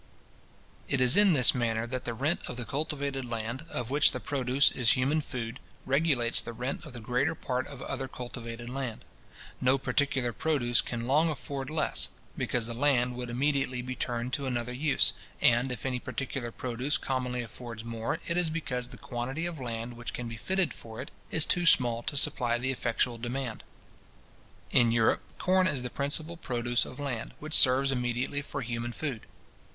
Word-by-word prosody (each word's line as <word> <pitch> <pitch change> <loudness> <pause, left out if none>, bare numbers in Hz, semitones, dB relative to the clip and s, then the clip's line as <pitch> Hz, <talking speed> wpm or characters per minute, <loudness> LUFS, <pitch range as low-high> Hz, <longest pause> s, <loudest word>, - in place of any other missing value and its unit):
It 140 - +1
is 125 0 +5
in 205 -3 +7
this 125 -7 +6
manner 115 -2 0
that 130 +1 -4
the 115 - -2
rent 145 +8 +1
of 125 - -5
the 120 - -4
cultivated 140 -1 -2
land, 120 +4 -4
of 125 0 -4
which 145 +1 +5
the - - -3
produce 135 -1 +3
is 120 -2 +4
human 140 +5 +2
food, 120 -3 -5 0.3
regulates 135 -4 +3
the 115 - -6
rent 125 +7 -3
of 150 - -10
the 120 - -7
greater 125 +7 0
part 130 -3 -2
of 140 -3 -8
other 135 0 -3
cultivated 120 -2 -7
land. 125 -3 -4 0.6
No 130 +2 +4
particular 135 -3 +1
produce 120 -3 +2
can 120 -1 -4
long 150 +6 +4
afford 140 -3 -4
less, 155 -1 +1 0.3
because 120 -2 0
the 115 - -3
land 125 -1 +2
would 125 -1 -5
immediately 135 0 +1
be 130 +1 -4
turned 120 0 -3
to 140 -2 0
another 125 -1 -2
use; 140 +3 +2 0.3
and 120 +2 +4
if 125 -1 -5
any 130 -1 0
particular 130 -2 -4
produce 130 +6 -1
commonly 125 -3 -2
affords 115 0 -8
more, 115 -1 -2
it 170 - 0
is 175 -2 +3
because 130 -6 -2
the - - -11
quantity 130 +7 -3
of 170 -3 -4
land 120 -1 -4
which 120 0 -6
can 125 - -4
be 115 - -6
fitted 185 - 0
for 110 0 -10
it 130 - -6 0.2
is 160 - +3
too 175 -1 +3
small 120 -6 +5
to 140 - -2
supply 125 -5 +2
the 130 +2 0
effectual 120 -1 0
demand. 120 -1 -3 1.1
In 120 -2 +5
Europe, 115 -1 +3 0.2
corn 185 0 +3
is 135 -8 0
the 125 - -4
principal 155 +5 -2
produce 120 -5 0
of 130 - -10
land, 130 -6 -3
which 155 +1 -7
serves 135 0 +6
immediately 125 +2 -1
for 140 -1 -5
human 120 0 -3
food. 135 -7 -4
125 Hz, 185 wpm, -30 LUFS, 120-140 Hz, 1.1 s, in